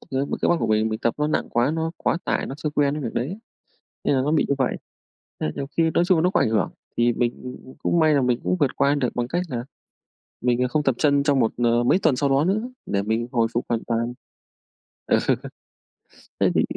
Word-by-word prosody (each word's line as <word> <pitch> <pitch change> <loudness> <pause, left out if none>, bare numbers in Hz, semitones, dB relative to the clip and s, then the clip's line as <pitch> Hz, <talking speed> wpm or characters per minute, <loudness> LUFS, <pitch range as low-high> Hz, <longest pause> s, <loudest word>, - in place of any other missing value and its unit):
ơ, - - -18
cơ 135 - +1
b - - -7
cơ - - +3
bắp 175 - +3
của 115 - +1
mình, 110 0 +2
mình 110 0 -3
tập 115 - 0
nó 150 - +1
nặng 155 - -1
quá, 120 +4 +2
nó 160 0 -1
quá - - 0
tải, - - -1
nó 135 - -5
chưa 150 -1 -2
quen 145 -1 +1
cái 150 - -4
việc 115 - -4
đấy, 145 - -2 0.7
nên - - +2
là 130 - +2
nó 145 +3 0
bị 160 - +3
như 140 - +2
vậy, 130 -3 0 0.6
nên 75 - -1
nhiều 135 - -4
khi 165 -1 +4
nói 175 - +3
chung 185 -2 +4
là - - +2
nó 180 - +3
có 190 - +2
ảnh - - +2
hưởng 110 -1 +1 0.3
thì 120 0 +3
mình, 120 +1 -1
ừm, 125 0 -6
ừm, 130 - -12
cũng 170 - +2
may 155 -1 +4
là 140 - +3
mình 125 -1 +1
cũng 180 - 0
vượt 140 -3 +1
qua 140 +1 +3
được 130 -4 0
bằng 120 -1 -1
cách 175 +7 -1
là 120 -3 -3 0.8
mình, 125 0 +2
à, 125 - +1
không 150 +3 0
tập 135 -4 +2
chân 140 -2 +3
trong 140 -2 +2
một 115 - +2
ờ, 120 0 +2
mấy 150 +9 +3
tuần 155 -8 +3
sau 140 +2 +1
đó 135 +3 +3
nữa 200 +4 +1 0.2
để 100 - 0
mình 110 +3 -1
hồi 115 -3 +2
phục 120 - -1
hoàn 115 -1 0
toàn. 115 +1 -1 0.9
Ờ, - - +3 1.2
thế - - +4
thì - - +4
130 Hz, 265 wpm, -23 LUFS, 120-150 Hz, 1.2 s, khi